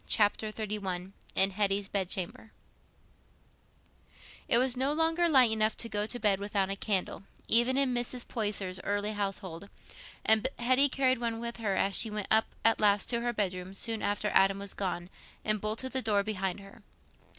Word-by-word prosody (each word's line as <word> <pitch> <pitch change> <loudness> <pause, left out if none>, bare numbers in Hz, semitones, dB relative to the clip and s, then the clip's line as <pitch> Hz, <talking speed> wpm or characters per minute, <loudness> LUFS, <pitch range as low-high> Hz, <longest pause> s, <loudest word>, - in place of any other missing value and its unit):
Chapter 215 0 +1
XXXI 195 -4 -4 0.2
In 195 +1 +4
Hetty's 200 0 0
Bed 190 -3 -2
Chamber 190 +4 -5 2.0
It - - +4
was 255 +1 +2
no 265 +3 +1
longer 325 +2 +1
light 260 -6 +6
enough 220 0 +1
to 230 - -1
go 210 -1 -1
to 245 - -3
bed 200 -4 +2
without 200 -1 -1
a - - -2
candle, 195 -2 -2 0.3
even 240 +3 +3
in 275 -2 +2
Mrs. 245 0 -2
Poyser's 205 -5 -2
early 205 +1 -1
household, 195 -3 -5 0.6
and 220 -1 +5
Hetty 255 +4 +3
carried 260 -1 +1
one 230 -1 -2
with 235 0 -5
her 210 -4 -1
as 195 +1 +1
she 225 - +4
went 210 -1 -4
up 220 0 +5 0.2
at 225 - +4
last 205 +1 +3
to 235 -1 0
her 240 0 0
bedroom 185 -3 -3
soon 225 +1 -2
after 205 +1 -1
Adam 195 0 +4
was 200 0 -2
gone, 180 -2 -4 0.3
and 215 -1 0
bolted 220 +5 -2
the 260 - 0
door 210 -4 +1
behind 195 -2 -3
her. 195 0 -15
210 Hz, 175 wpm, -30 LUFS, 195-235 Hz, 2.0 s, light